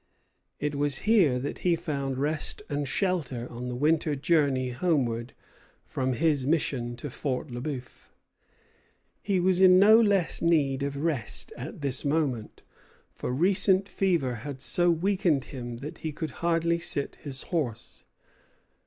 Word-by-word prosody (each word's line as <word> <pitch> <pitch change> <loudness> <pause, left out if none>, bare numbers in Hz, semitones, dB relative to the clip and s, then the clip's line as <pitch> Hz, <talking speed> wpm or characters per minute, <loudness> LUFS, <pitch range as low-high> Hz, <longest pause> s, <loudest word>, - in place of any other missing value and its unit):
It 150 0 -2
was 145 -1 0
here 190 - +4
that 135 +3 -4
he 175 -2 +2
found 140 -6 -3
rest 150 +2 -2
and 145 -1 -2
shelter 135 - -1
on 125 +1 -6
the 125 - -4
winter 150 +2 +1
journey 140 -3 +1
homeward 125 -5 -1 0.5
from 130 -1 -2
his 145 -1 +1
mission 130 -6 0
to 130 +5 -7
Fort 135 +1 -3
Le 120 0 -5
Bœuf. 130 -3 -7 1.1
He 195 -3 0
was 185 +1 +2
in 185 -1 +8
no 215 +4 +7
less 200 -5 +1
need 145 -6 +2
of 140 0 -2
rest 150 -9 -3
at - - -8
this 135 -2 0
moment; 140 -7 -1 0.5
for - - -5
recent 190 +6 +3
fever 170 -10 0
had 140 0 -6
so 175 +6 +2
weakened 170 -4 +1
him 120 -3 -7
that 140 +5 -8
he 160 -2 -4
could 155 0 -5
hardly 170 0 +1
sit 145 -4 -2
his 135 -3 -4
horse. 120 -9 -3
145 Hz, 145 wpm, -27 LUFS, 130-170 Hz, 1.1 s, in